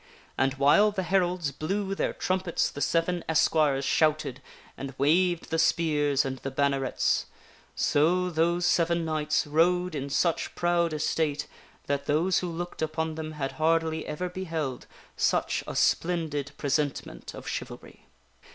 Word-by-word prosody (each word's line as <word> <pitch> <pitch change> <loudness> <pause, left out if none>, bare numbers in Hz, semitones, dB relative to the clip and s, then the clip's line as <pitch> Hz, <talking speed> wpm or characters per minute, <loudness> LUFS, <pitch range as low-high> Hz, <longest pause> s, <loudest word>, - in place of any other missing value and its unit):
And 135 0 +1
while 145 +10 +5
the 200 -2 -3
heralds 180 -4 +1
blew 195 +8 -2
their - - -1
trumpets 185 -2 -1
the 145 - -7
seven 170 +4 +1
esquires 155 -3 +2
shouted, 150 -4 +1 0.3
and 135 -1 -7
waved 175 +4 +2
the 165 - +1
spears 150 -4 +2
and 130 -1 -4
the 135 - -4
bannerets. 135 -1 0 0.5
So 180 +5 +2
those 170 +2 +1
seven 170 -1 +2
knights 155 -1 0
rode 175 +4 +2
in 140 -2 -4
such 165 +4 0
proud 175 -1 +1
estate 150 -1 -1 0.4
that 140 0 -2
those 165 +6 +2
who 180 - -3
looked 175 +1 -6
upon 160 0 -1
them 155 0 -6
had 135 -3 -3
hardly 160 0 +1
ever 150 +4 -3
beheld 165 -7 -4 0.3
such - - +1
a - - -5
splendid 155 -5 0
presentment 140 - -2
of - - -10
chivalry. - - -7
160 Hz, 140 wpm, -27 LUFS, 145-175 Hz, 0.5 s, while